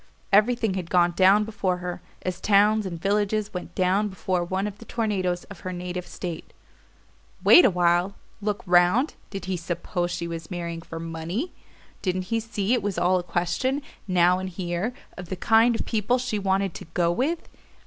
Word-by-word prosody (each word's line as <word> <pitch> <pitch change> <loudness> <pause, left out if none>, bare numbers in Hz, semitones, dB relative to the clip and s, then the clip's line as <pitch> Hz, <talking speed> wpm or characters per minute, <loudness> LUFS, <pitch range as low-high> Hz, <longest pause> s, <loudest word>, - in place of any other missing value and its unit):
Everything 220 0 +4
had 180 -3 -4
gone 175 -1 +4
down 190 +4 +5
before 200 -4 -1
her, 180 0 -5 0.2
as 185 -1 -3
towns 210 0 +4
and 170 -3 -6
villages 205 +2 0
went 180 -2 -6
down 190 +3 +2
before 185 -2 -1
one 190 +3 -2
of 205 -1 -6
the 230 - -11
tornadoes 190 -6 -1
of 200 -5 -12
her 185 - -5
native 180 0 -5
state. 175 -3 -7 0.9
Wait 355 - +9
awhile? 175 +1 +2 0.3
Look 205 0 -2
round? 180 - +4 0.2
Did 195 -2 -6
he 190 0 -1
suppose 175 +1 -3
she 175 -1 -3
was 165 -1 -6
marrying 170 -2 -4
for 165 0 -8
MONEY? 165 - -4 0.5
Didn't 185 -1 -1
he 225 - +3
see 220 -1 -1
it 245 - +2
was 200 -1 -2
all 180 +1 +3
a - - -5
question, 180 +11 -1 0.2
now 180 0 +4
and 190 0 -4
here, 175 +4 -2 0.3
of 180 -2 -8
the 190 - -2
kind 225 +5 +4
of - - -3
people 225 +2 +1
she 245 -4 -2
wanted 195 -1 0
to - - -8
"go 170 -1 +3
with"? 290 - -1
185 Hz, 180 wpm, -25 LUFS, 175-210 Hz, 0.9 s, Wait